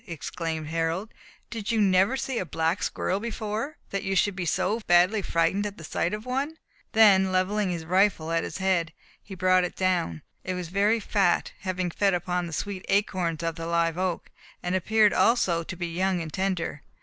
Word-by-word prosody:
exclaimed 165 -1 -4
Harold, 165 +6 -2 0.4
"did 225 -1 -3
you 225 - +1
never 195 +5 +3
see 260 -3 -2
a - - -1
black 165 +2 -1
squirrel 190 - -1
before, 225 +4 -4
that 195 - -1
you 195 0 -2
should 200 +1 +2
be 180 -3 -3
so 215 +7 0
badly 180 +5 +4
frightened 185 +3 +1
at 205 -1 -5
the 165 - -10
sight 170 +2 -1
of 215 +2 -5
one?" 275 +5 -2 0.4
then 195 -4 +6
levelling 190 +2 +1
his 170 -2 -4
rifle 185 -2 +2
at 165 0 +1
its - - -5
head, 185 -4 0 0.3
he 195 - -10
brought 185 0 +3
it 180 - -3
down. 180 - 0 0.2
It 185 - -3
was 180 -2 -5
very 205 +5 +2
fat, 195 -4 +1
having 185 -2 -2
fed 195 +1 +2
upon 180 0 -2
the 165 - -8
sweet 195 +3 -4
acorns 180 -5 0
of 165 0 -1
the 165 0 -5
live 170 -1 +1
oak, 185 -2 -2 0.3
and 180 - -1
appeared 210 +3 +3
also 185 -8 +3
to 170 - -7
be 175 -1 -4
young 185 +1 +1
and 160 -3 -6
tender. 185 -6 -2
185 Hz, 195 wpm, -26 LUFS, 170-205 Hz, 0.4 s, then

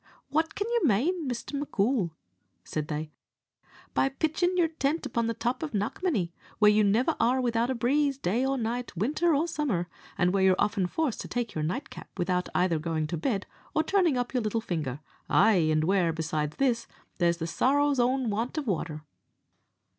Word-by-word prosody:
"What 320 +2 0
can 410 - -2
you 475 0 +1
mane, 305 - +2
Mr. 245 +3 -5
M'Coul," 245 -7 0 0.5
said 155 -1 -3
they, 155 0 -4 0.8
"by 270 - +2
pitching 320 +6 0
your 335 -2 +3
tent 310 0 -1
upon 235 -3 -1
the 230 - -1
top 240 +6 -2
of 305 -7 -4
Knockmany, 205 - -1 0.3
where 210 -1 +6
you 210 0 +4
never 210 +5 +2
are 250 +3 +3
without 235 -1 +1
a 260 - 0
breeze, 275 +4 +1
day 235 +1 0
or 270 0 +1
night, 240 -3 -3
winter 300 - +2
or 310 +4 +1
summer, 275 - -1 0.3
and 180 +1 +2
where 195 - +2
you're 190 -1 +5
often 205 -3 +1
forced 295 - -1
to - - -7
take 240 -3 -3
your 155 - -2
nightcap 160 +4 -5
without 180 0 0
either 175 -3 +2
going 160 -1 -1
to 155 - -3
bed 200 - -1 0.3
or 310 - +3
turning 355 -9 +2
up 245 +1 -2
your 250 - +1
little 215 +1 0
finger; 155 - -3 0.3
ay, 220 +2 +5 0.2
an' 155 0 +2
where, 180 -2 +2
besides 155 -2 -2
this, 240 -4 +1 0.3
there's 170 -1 +3
the 165 - -3
sorrow's 280 - +2
own 250 -1 +2
want 230 +8 -2
of 305 - -1
water?" 160 -7 -2
230 Hz, 185 wpm, -28 LUFS, 180-275 Hz, 0.8 s, where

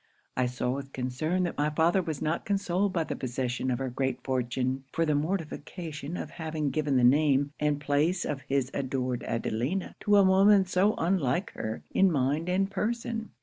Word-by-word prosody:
I 130 -1 +1
saw 125 0 -2
with 135 +1 -5
concern 145 +8 -1
that 175 - -3
my 150 +1 +2
father 165 +5 +3
was 160 -5 -4
not 160 +2 -1
consoled 195 -1 0
by 170 -3 0
the - - -4
possession 130 0 -2
of 125 - +1
her 130 0 -3
great 130 +1 -2
fortune, 130 0 -1
for 165 - +1
the 155 - +1
mortification 160 0 -3
of - - -6
having 155 -3 -3
given 150 -3 +1
the 125 - +3
name 140 +2 +4
and 150 -1 +1
place 150 +5 +1
of 140 -3 -3
his 135 -1 0
adored 130 -2 -2
Adelina 120 - -2
to 205 -1 +3
a 200 - +7
woman 195 +1 +5
so 190 +3 +2
unlike 170 -1 0
her 110 0 -5
in 195 -1 +4
mind 145 +4 0
and 195 +2 +1
person. 225 +2 -2
150 Hz, 185 wpm, -28 LUFS, 130-180 Hz, -, a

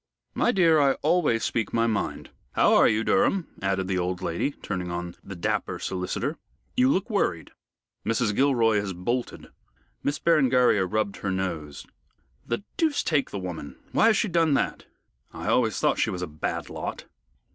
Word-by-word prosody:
"My - - +2
dear, 165 -7 +4
I 140 -2 +4
always 150 -8 +2
speak 115 -2 -1
my 115 0 +2
mind. 110 -3 -2 0.2
How - - +4
are - - +6
you, 110 +1 +1
Durham?" 195 - +2 0.2
added 95 -1 0
the 95 -1 0
old 90 0 -2
lady, 90 +7 -1
turning 95 -10 -5
on 85 0 -4
the 100 - -8
dapper 85 - -2
solicitor. 95 - -3 0.4
"You 255 +1 +4
look 195 -5 +1
worried." 145 - -1 0.5
"Mrs. 115 -1 0
Gilroy 115 -5 +3
has 100 -2 -3
bolted." 120 +8 -3 0.5
Miss 145 - -1
Berengaria 125 - +3
rubbed 105 0 -1
her 100 - -3
nose. 85 -6 -3 0.6
"The 120 - -3
deuce 315 -3 +1
take 145 -5 +1
the - - -5
woman! 90 -6 -6 0.2
Why - - +4
has 220 - +4
she 220 - +1
done 165 -5 +2
that? - - -2 0.5
I - - -4
always - - +2
thought - - +1
she - - +2
was 90 -1 -3
a - - -3
bad 75 0 -4
lot." - - -5
115 Hz, 170 wpm, -26 LUFS, 95-150 Hz, 0.6 s, are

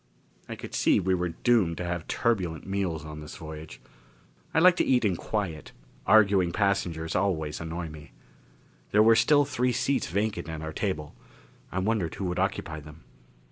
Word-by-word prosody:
I - - -4
could - - -9
see - - +3
we 95 0 +1
were 90 -1 0
doomed 90 -1 +2
to 90 - -3
have 85 -2 -3
turbulent 95 -9 -1
meals 95 -5 -2
this 75 0 -9
voyage. 80 0 -9 0.7
I - - -2
like 180 +2 +7
to - - +3
eat 125 -3 +2
in 95 -4 +2
quiet; 85 -5 -4 0.3
arguing 100 -5 +5
passengers 90 -5 -1
always 80 -6 -1
annoy 85 +1 -4
me. 75 -3 -12 0.8
There 105 +1 +5
were 115 +1 +6
still 145 +6 +4
three 125 -2 0
seats 130 +3 0
vacant 100 -1 -2
at 80 -1 -5
our 80 0 -5
table; 80 -6 -3 0.6
I - - -4
wondered 95 -4 0
who 100 - -4
would 90 -1 -2
occupy 80 0 -2
them. 75 +1 -13
90 Hz, 170 wpm, -27 LUFS, 80-110 Hz, 0.8 s, like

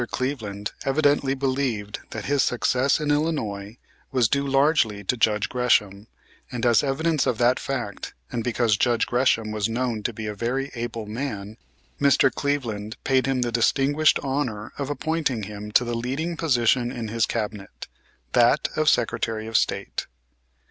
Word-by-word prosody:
Cleveland 110 -7 -3
evidently 140 -1 +2
believed 130 -6 -2
that 110 - -6
his 140 -1 +2
success 125 +2 +2
in 150 -1 0
Illinois 115 -9 -1 0.3
was 125 -4 +3
due 140 +4 0
largely 135 -7 +2
to 115 - 0
Judge 105 -3 +2
Gresham, 110 -5 +1 0.4
and 125 -1 -3
as 120 -2 +5
evidence 150 +1 0
of 120 - +1
that 120 +2 +3
fact, 120 -7 -4 0.2
and 115 - -2
because 115 -3 +1
Judge 120 +1 +2
Gresham 120 -3 +1
was 105 0 -1
known 120 -1 -1
to 120 - -1
be 110 0 -7
a 105 - -3
very 125 +6 -2
able 115 -2 -4
man, 105 -2 -5 0.5
Mr. 140 -1 +4
Cleveland 120 -6 -2
paid 130 -1 +2
him 130 -2 +1
the 120 - -2
distinguished 140 +6 +3
honor 130 -6 -2
of 140 -1 -2
appointing 145 -6 -1
him 105 +1 -7
to 125 - +5
the 120 0 -3
leading 135 +9 -2
position 125 -5 +2
in 115 -4 -5
his 115 +2 +1
cabinet, 105 - -5 0.5
that - - +4
of - - +3
Secretary 110 -1 0
of 115 0 -7
State. - - 0
120 Hz, 155 wpm, -24 LUFS, 110-135 Hz, 0.5 s, as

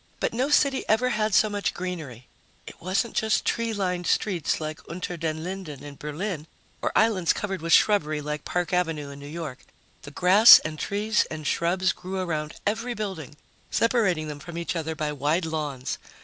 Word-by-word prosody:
But - - -1
no 255 +5 0
city 280 -2 +3
ever 240 +4 +3
had 215 -3 0
so 215 - +5
much 205 -1 -2
greenery. 155 -10 -6 0.4
It - - -12
wasn't 195 +6 -1
just 220 -1 +1
tree 230 -1 0
lined 180 -4 -2
streets, 185 -7 0
like 155 -1 -5
Unter 180 +1 -4
den 160 -1 -3
Linden 180 -6 -6
in 145 -1 -9
Berlin, 155 +3 -5 0.3
or - - 0
islands 205 -7 +3
covered 195 -4 -4
with 165 +1 -3
shrubbery, 155 -6 +4
like 150 0 -4
Park 180 +1 -2
Avenue 165 -5 -1
in 140 - -10
New 140 - -9
York. 155 -4 -6 0.4
The - - -9
grass 185 +9 +8
and 155 0 -4
trees 210 +2 +1
and 155 -1 -6
shrubs 185 +4 +1
grew 185 +1 -6
around 155 -4 -3
every 230 +4 -1
building, 190 -9 -5 0.3
separating 200 -10 +1
them 150 -1 -6
from 170 +3 -8
each 170 +1 -3
other 160 -1 -3
by 155 -1 -2
wide 150 +5 0
lawns. 145 -5 -3
175 Hz, 180 wpm, -26 LUFS, 155-205 Hz, 0.4 s, grass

